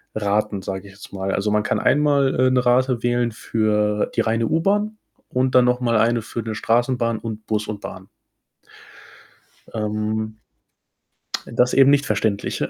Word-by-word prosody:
Raten, 105 Hz, -1 st, -1 dB
sage 95 Hz, +1 st, -5 dB
ich 100 Hz, -, -14 dB
jetzt 100 Hz, -, -13 dB
mal. 95 Hz, 0 st, -3 dB
Also, 105 Hz, +1 st, 0 dB
man 105 Hz, -, +2 dB
kann -, -, 0 dB
einmal, 145 Hz, -2 st, +2 dB
äh, 130 Hz, 0 st, +4 dB
'ne 125 Hz, -1 st, +1 dB
Rate 125 Hz, -1 st, +2 dB
wählen 120 Hz, -1 st, +1 dB
für 105 Hz, -1 st, 0 dB
die -, -, +3 dB
reine 115 Hz, 0 st, 0 dB
U-Bahn 205 Hz, -, 0 dB, 0.3 s
und 130 Hz, 0 st, 0 dB
dann 125 Hz, -1 st, +6 dB
noch 125 Hz, 0 st, +2 dB
mal 120 Hz, -2 st, +1 dB
eine 115 Hz, +1 st, +2 dB
für 115 Hz, -, -5 dB
'ne 110 Hz, -1 st, -5 dB
Straßenbahn 115 Hz, 0 st, 0 dB
und 110 Hz, -1 st, -7 dB
Bus 105 Hz, -1 st, -1 dB
und 105 Hz, -1 st, -5 dB
Bahn. 95 Hz, 0 st, -9 dB, 1.7 s
Ähm, 110 Hz, 0 st, -2 dB, 1.1 s
das 125 Hz, +1 st, +1 dB
eben 135 Hz, 0 st, +6 dB
nicht 145 Hz, 0 st, +3 dB
verständlich. 105 Hz, -1 st, -1 dB
115 Hz, 160 wpm, -21 LUFS, 105-125 Hz, 1.7 s, dann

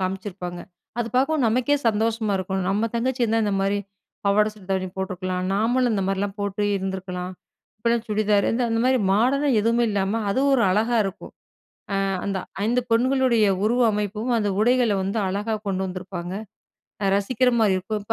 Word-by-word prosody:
காம்ச்சிருப்பாங்க. 185 Hz, -2 st, -4 dB, 0.4 s
அது 230 Hz, -, -1 dB
பாக்கவும் 275 Hz, +2 st, +2 dB
நமக்கே 250 Hz, +6 st, +2 dB
சந்தோஷமா 220 Hz, 0 st, 0 dB
இருக்கும். 190 Hz, +1 st, -2 dB
"நம்ம 210 Hz, +4 st, +1 dB
தங்கச்சி 245 Hz, +2 st, 0 dB
இருந்தா 225 Hz, 0 st, +1 dB
இந்த 205 Hz, -, 0 dB
மாரி, 200 Hz, +1 st, +1 dB, 0.5 s
பாவாட 205 Hz, +1 st, +4 dB
சட்ட 210 Hz, -3 st, -16 dB
தாவணி 190 Hz, -1 st, 0 dB
போட்ருக்கலாம், 185 Hz, -1 st, -3 dB
நாமளும் 240 Hz, +3 st, +2 dB
இந்த 195 Hz, -, 0 dB
மாரிலாம் 195 Hz, +1 st, -2 dB
போட்டு 200 Hz, 0 st, -2 dB
இருந்திருக்கலாம்." 190 Hz, -1 st, -4 dB, 0.5 s
இப்ப 220 Hz, -, -10 dB
எல்லாம் 235 Hz, -1 st, 0 dB
சுடிதாரு, 210 Hz, -1 st, +2 dB
இந்த 250 Hz, -, 0 dB
அந்த 225 Hz, -, +1 dB
மாரி 260 Hz, 0 st, +3 dB
மாடர்னா 275 Hz, +7 st, +2 dB
எதுவுமே 230 Hz, +2 st, +2 dB
இல்லாம 200 Hz, +2 st, 0 dB
அது 260 Hz, -, +1 dB
ஒரு 260 Hz, -3 st, +4 dB
அழகா 225 Hz, +5 st, +2 dB
இருக்கும். 195 Hz, 0 st, -6 dB, 0.6 s
அ -, -, +1 dB, 0.3 s
அந்த 195 Hz, -1 st, -1 dB, 0.3 s
5 245 Hz, +3 st, +2 dB
பெண்களுடைய 245 Hz, -1 st, +3 dB, 0.2 s
உருவ 240 Hz, +3 st, +2 dB
அமைப்பும், 210 Hz, +3 st, -2 dB
அந்த 210 Hz, -2 st, 0 dB
உடைகள 245 Hz, -1 st, +3 dB
வந்து 195 Hz, +4 st, -2 dB
அழகா 205 Hz, +4 st, -2 dB
கொண்டு 190 Hz, -1 st, -1 dB
வந்திருப்பாங்க. 180 Hz, -1 st, -6 dB, 0.7 s
அ -, -, +2 dB
ரசிக்கிற 250 Hz, +5 st, +1 dB
மாரி 210 Hz, -3 st, +4 dB
இருக்கும். 205 Hz, +3 st, -3 dB
இப்ப 220 Hz, +2 st, -2 dB
210 Hz, 165 wpm, -23 LUFS, 195-235 Hz, 0.7 s, பாவாட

